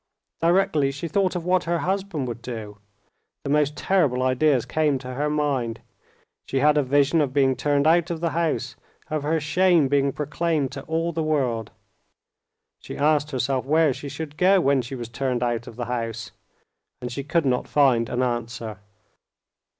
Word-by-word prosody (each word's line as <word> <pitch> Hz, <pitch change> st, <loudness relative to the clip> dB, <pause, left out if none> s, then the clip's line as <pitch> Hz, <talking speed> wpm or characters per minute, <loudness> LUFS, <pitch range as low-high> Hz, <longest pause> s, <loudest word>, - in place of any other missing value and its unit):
Directly 165 Hz, -5 st, +2 dB
she 140 Hz, +5 st, -5 dB
thought 185 Hz, +3 st, 0 dB
of 175 Hz, -2 st, -3 dB
what 180 Hz, 0 st, +2 dB
her 170 Hz, +1 st, 0 dB
husband 190 Hz, -6 st, -2 dB
would 120 Hz, 0 st, -6 dB
do, 110 Hz, -4 st, -7 dB, 0.6 s
the 140 Hz, -, -3 dB
most 150 Hz, 0 st, +1 dB
terrible 145 Hz, -10 st, +1 dB
ideas 130 Hz, 0 st, +2 dB
came 150 Hz, -3 st, +1 dB
to 130 Hz, -1 st, -7 dB
her 145 Hz, +3 st, -1 dB
mind. 135 Hz, -6 st, -1 dB, 0.7 s
She 135 Hz, -, -2 dB
had 150 Hz, +2 st, +4 dB
a 150 Hz, -, +4 dB
vision 145 Hz, +4 st, +2 dB
of 135 Hz, -3 st, -1 dB
being 135 Hz, -2 st, +3 dB
turned 145 Hz, 0 st, +1 dB
out 170 Hz, +2 st, +3 dB
of 170 Hz, -2 st, -3 dB
the 165 Hz, 0 st, -1 dB
house, 155 Hz, -6 st, -1 dB, 0.4 s
of 155 Hz, -1 st, -1 dB
her 160 Hz, +3 st, 0 dB
shame 170 Hz, 0 st, +3 dB
being 140 Hz, 0 st, +2 dB
proclaimed 150 Hz, 0 st, -1 dB
to 135 Hz, -, -6 dB
all 165 Hz, +2 st, -1 dB
the 165 Hz, -, -1 dB
world. 130 Hz, -8 st, -1 dB, 1.1 s
She -, -, -9 dB
asked 150 Hz, 0 st, +2 dB
herself 130 Hz, -1 st, -1 dB
where 155 Hz, -1 st, +3 dB
she 140 Hz, -, -7 dB
should 150 Hz, +1 st, -7 dB
go 190 Hz, +2 st, +5 dB
when 140 Hz, -5 st, +2 dB
she 130 Hz, +3 st, -7 dB
was 120 Hz, -2 st, -6 dB
turned 125 Hz, +1 st, -2 dB
out 120 Hz, -1 st, -2 dB
of 115 Hz, -, -10 dB
the 120 Hz, 0 st, -4 dB
house, 115 Hz, -2 st, -4 dB, 0.7 s
and 125 Hz, 0 st, -6 dB
she 140 Hz, +3 st, -4 dB
could 160 Hz, +2 st, 0 dB
not 125 Hz, -2 st, 0 dB
find 125 Hz, -6 st, +3 dB
an 125 Hz, +1 st, 0 dB
answer. 115 Hz, -3 st, -3 dB
145 Hz, 180 wpm, -24 LUFS, 125-160 Hz, 1.1 s, go